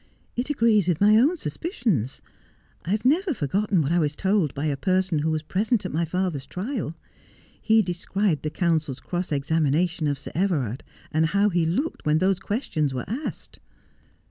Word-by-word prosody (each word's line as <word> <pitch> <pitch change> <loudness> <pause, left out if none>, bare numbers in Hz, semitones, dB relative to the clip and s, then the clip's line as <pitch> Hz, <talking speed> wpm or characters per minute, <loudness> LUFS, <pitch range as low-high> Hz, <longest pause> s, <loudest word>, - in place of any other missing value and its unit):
It 245 +4 -2
agrees 225 - +3
with 175 -4 +1
my 210 +1 +6
own 285 +11 +4
suspicious. 225 - -2 0.6
I - - -5
have 210 +4 0
never 325 +4 +3
forgotten 190 - +1
what 140 - -1
I 175 - +3
was 150 -2 0
told 190 -6 +1
by 145 +2 -2
a 145 -2 +1
person 185 +2 +1
who 155 +2 0
was 155 -1 -1
present 205 +6 0
at - - -3
my 165 +2 +1
father's 165 -5 -2
trial. 190 - -4 0.7
He 220 0 +4
described 180 -1 -1
the 155 - -2
counsel's 155 -5 0
cross 175 +5 -4
examination 155 +3 +1
of 145 -1 0
Sir 140 - -8
Everard, 150 - 0 0.3
and 160 +1 +2
how 200 +4 +2
he 170 -3 +1
looked 270 - -2
when 150 0 +3
those 190 +2 +2
questions 160 - -2
were 125 - -3
asked.' 260 +8 -5
175 Hz, 175 wpm, -25 LUFS, 155-210 Hz, 0.7 s, my